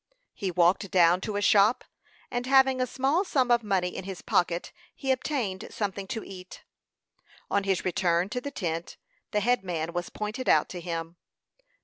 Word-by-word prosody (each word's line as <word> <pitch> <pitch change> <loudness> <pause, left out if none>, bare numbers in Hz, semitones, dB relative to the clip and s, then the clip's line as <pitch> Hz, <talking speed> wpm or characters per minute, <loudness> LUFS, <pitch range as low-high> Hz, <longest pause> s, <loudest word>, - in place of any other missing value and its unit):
He 195 - -3
walked 180 +3 +2
down 175 0 +4
to 210 0 -4
a 205 - -1
shop, 205 +3 +4 0.5
and 245 +1 -2
having 265 -1 +4
a 255 - +1
small 270 +8 +1
sum 260 -9 +1
of 240 0 +5
money 190 -4 -1
in - - -5
his 190 -1 -7
pocket, 175 -1 0 0.2
he 270 - -1
obtained 250 -8 -2
something 200 -2 -4
to 220 +2 -4
eat. 185 -1 -11 0.9
On 200 -1 +1
his 195 -2 0
return 175 -1 +1
to 250 +4 -3
the 285 - -4
tent, 170 - -4 0.3
the 210 - 0
head 245 -1 +2
man 170 -2 -3
was 175 0 -3
pointed 215 +5 -4
out - - +4
to 180 - -6
him. 165 0 -5
195 Hz, 175 wpm, -27 LUFS, 180-245 Hz, 0.9 s, of